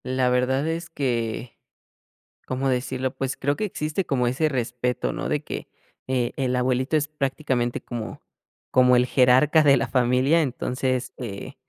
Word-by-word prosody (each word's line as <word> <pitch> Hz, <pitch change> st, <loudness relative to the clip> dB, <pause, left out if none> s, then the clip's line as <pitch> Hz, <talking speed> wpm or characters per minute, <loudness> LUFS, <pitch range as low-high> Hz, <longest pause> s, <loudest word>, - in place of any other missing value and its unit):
La 130 Hz, 0 st, +1 dB
verdad 130 Hz, +3 st, +1 dB
es 165 Hz, +1 st, -3 dB
que, 120 Hz, -5 st, -3 dB, 0.9 s
¿cómo 130 Hz, +1 st, -1 dB
decirlo? 130 Hz, +1 st, -2 dB
Pues 135 Hz, 0 st, -3 dB
creo 140 Hz, +2 st, 0 dB
que 215 Hz, -, -2 dB
existe 155 Hz, -1 st, -3 dB
como 125 Hz, -3 st, +1 dB
ese 130 Hz, +6 st, +1 dB
respeto, 125 Hz, -2 st, -2 dB
¿no?, -, -, -4 dB
de -, -, -1 dB
que, -, -, -6 dB, 0.4 s
eh, 125 Hz, -2 st, 0 dB
el 130 Hz, -2 st, 0 dB
abuelito 130 Hz, +4 st, +1 dB
es 150 Hz, -1 st, +1 dB
prácticamente 135 Hz, -4 st, -2 dB
como 115 Hz, -3 st, -6 dB, 0.5 s
como 125 Hz, -1 st, +5 dB
el 125 Hz, -, +4 dB
jerarca 130 Hz, +5 st, +5 dB
de 140 Hz, -2 st, +6 dB
la 120 Hz, 0 st, -1 dB
familia. 130 Hz, +5 st, +3 dB
Entonces, 130 Hz, -2 st, -1 dB
eh, 105 Hz, -6 st, -6 dB
130 Hz, 155 wpm, -24 LUFS, 125-140 Hz, 0.9 s, de